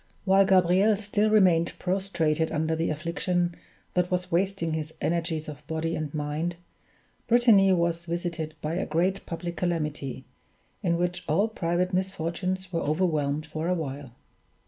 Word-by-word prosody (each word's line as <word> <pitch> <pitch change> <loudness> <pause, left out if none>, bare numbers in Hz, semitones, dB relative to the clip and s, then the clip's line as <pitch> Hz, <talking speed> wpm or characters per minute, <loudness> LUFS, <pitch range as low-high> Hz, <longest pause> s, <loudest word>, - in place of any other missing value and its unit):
While 195 0 +5
Gabriel 190 +3 +4
still 210 +1 +1
remained 180 -6 +4
prostrated 170 -4 0
under 160 +1 0
the 165 +1 0
affliction 175 +3 -1 0.4
that 180 0 +1
was 180 0 -2
wasting 175 -2 0
his 155 0 -4
energies 165 -2 -1
of 150 -1 -9
body 160 +1 -2
and 155 -2 -3
mind, 150 +3 -2 0.7
Brittany 230 -5 +6
was 170 -1 +1
visited 170 -2 -3
by 155 +2 -1
a 180 - -1
great 180 +5 0
public 170 0 -5
calamity, 150 -6 -2 0.6
in 170 -4 +1
which 180 0 -1
all 195 +8 +3
private 180 -3 -1
misfortunes 185 0 -2
were 165 - 0
overwhelmed 155 -2 0
for 155 +1 -4
a 180 - +2
while. 140 -5 -5
170 Hz, 145 wpm, -27 LUFS, 160-185 Hz, 0.7 s, Brittany